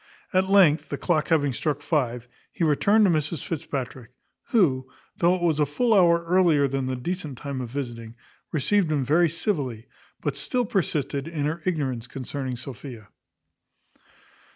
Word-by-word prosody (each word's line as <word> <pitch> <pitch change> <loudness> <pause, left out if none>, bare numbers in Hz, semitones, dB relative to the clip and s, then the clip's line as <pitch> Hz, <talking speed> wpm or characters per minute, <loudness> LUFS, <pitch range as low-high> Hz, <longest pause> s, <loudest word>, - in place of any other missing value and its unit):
At 190 +1 +2
length, 180 -6 +5
the - - -3
clock 155 -4 0
having 145 -5 +2
struck 145 +4 -2
five, 125 -7 -1 0.2
he - - -3
returned 200 +8 +4
to 190 - +4
Mrs 155 -2 -1
Fitzpatrick, 130 -6 -5 0.4
who, 130 - +2 0.3
though 175 +1 +3
it 180 - -4
was 160 -3 +2
a 150 - +4
full 230 - +1
hour 170 -4 +4
earlier 170 -5 +4
than 135 -1 -2
the 130 - -1
decent 150 +1 -4
time 140 -1 -5
of 120 - -5
visiting, 115 -4 -6 0.4
received 165 +3 +1
him 140 -4 0
very 165 +5 +4
civilly; 145 - -2 0.3
but - - -2
still 250 -3 -1
persisted 150 -7 -1
in 155 -4 -3
her 160 +3 -2
ignorance 135 -9 -1
concerning 130 0 -5
Sophia. 120 -3 -9
150 Hz, 155 wpm, -25 LUFS, 130-175 Hz, 0.4 s, length